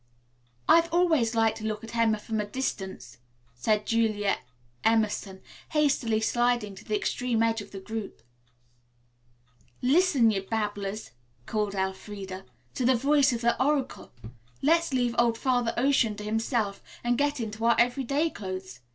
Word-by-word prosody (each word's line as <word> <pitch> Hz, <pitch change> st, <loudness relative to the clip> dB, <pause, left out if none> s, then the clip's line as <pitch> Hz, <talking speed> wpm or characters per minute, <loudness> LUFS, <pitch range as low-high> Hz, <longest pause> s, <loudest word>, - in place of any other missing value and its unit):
"I -, -, +8 dB
have 335 Hz, 0 st, +1 dB
always 320 Hz, -10 st, +2 dB
liked 225 Hz, 0 st, +2 dB
to -, -, -9 dB
look 215 Hz, 0 st, -3 dB
at 225 Hz, +1 st, -8 dB
Emma 225 Hz, -2 st, +3 dB
from 220 Hz, +1 st, -4 dB
a -, -, -3 dB
distance," 190 Hz, -, -5 dB, 0.3 s
said 210 Hz, -, 0 dB
Julia 215 Hz, -3 st, +1 dB, 0.4 s
Emerson, 215 Hz, -4 st, 0 dB, 0.3 s
hastily 270 Hz, -7 st, +2 dB
sliding 240 Hz, -2 st, +1 dB
to 195 Hz, +2 st, -12 dB
the 215 Hz, -, -2 dB
extreme 235 Hz, +1 st, 0 dB
edge 225 Hz, -1 st, +1 dB
of -, -, -11 dB
the 195 Hz, -, -8 dB
group. 220 Hz, +2 st, -6 dB, 1.6 s
"Listen, 270 Hz, -4 st, +4 dB
ye 200 Hz, -, 0 dB
babblers," 205 Hz, -1 st, -3 dB, 0.3 s
called 210 Hz, -, -2 dB
Elfreda, 190 Hz, 0 st, -4 dB, 0.3 s
"to -, -, -2 dB
the 255 Hz, +1 st, +4 dB
voice 280 Hz, +3 st, +3 dB
of 235 Hz, -1 st, -3 dB
the 235 Hz, +2 st, +2 dB
oracle. 275 Hz, -2 st, -1 dB, 0.5 s
Let's 335 Hz, +2 st, +3 dB
leave 245 Hz, -2 st, +1 dB
old 235 Hz, -1 st, +3 dB
Father 245 Hz, -3 st, +1 dB
Ocean 255 Hz, -4 st, +2 dB
to 210 Hz, -, -8 dB
himself 220 Hz, -1 st, -1 dB, 0.2 s
and 240 Hz, 0 st, +2 dB
get 285 Hz, +1 st, 0 dB
into 220 Hz, -1 st, -5 dB
our 235 Hz, -, +5 dB
everyday 275 Hz, +6 st, +1 dB
clothes. 185 Hz, -11 st, -7 dB
225 Hz, 150 wpm, -27 LUFS, 210-255 Hz, 1.6 s, I